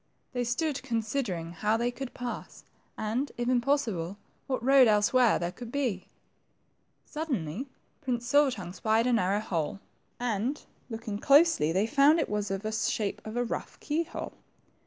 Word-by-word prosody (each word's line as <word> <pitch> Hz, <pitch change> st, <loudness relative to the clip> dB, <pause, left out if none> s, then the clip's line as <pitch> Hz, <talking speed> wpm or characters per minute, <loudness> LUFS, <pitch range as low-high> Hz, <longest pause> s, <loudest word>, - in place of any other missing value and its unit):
They 245 Hz, -1 st, 0 dB
stood 280 Hz, +5 st, -1 dB
considering 225 Hz, -8 st, -2 dB
how 210 Hz, +6 st, +1 dB
they 240 Hz, +1 st, 0 dB
could 265 Hz, +1 st, -7 dB
pass, 245 Hz, -1 st, -6 dB, 0.3 s
and, 230 Hz, +6 st, -1 dB
if 240 Hz, 0 st, -2 dB
impossible, 235 Hz, -, +1 dB, 0.3 s
what 260 Hz, -4 st, -2 dB
road 270 Hz, -2 st, +7 dB
elsewhere 220 Hz, +3 st, +4 dB
thqre 175 Hz, +1 st, -3 dB
could 240 Hz, -2 st, -8 dB
be. 245 Hz, -10 st, -1 dB, 1.0 s
Suddenly 260 Hz, -, -3 dB, 0.3 s
Prince 245 Hz, -4 st, -2 dB
Silver 285 Hz, +3 st, +5 dB
tongue 185 Hz, -8 st, -6 dB
spied 220 Hz, +3 st, +1 dB
a 250 Hz, -, +2 dB
narrow 200 Hz, -1 st, +2 dB
hole, 175 Hz, -3 st, -2 dB, 0.4 s
and 245 Hz, +4 st, -1 dB, 0.2 s
looking 225 Hz, -3 st, -5 dB
closely 280 Hz, -, +5 dB
they 190 Hz, +5 st, +2 dB
found 290 Hz, +6 st, +5 dB
it -, -, 0 dB
was 210 Hz, -1 st, -1 dB
of 195 Hz, +1 st, -3 dB
the 215 Hz, -, -2 dB
shape 220 Hz, -1 st, -1 dB
of 220 Hz, +2 st, -5 dB
a 245 Hz, -, +2 dB
rough 240 Hz, -, -5 dB
key 315 Hz, +2 st, 0 dB
hole. -, -, -6 dB
235 Hz, 155 wpm, -29 LUFS, 205-265 Hz, 1.0 s, road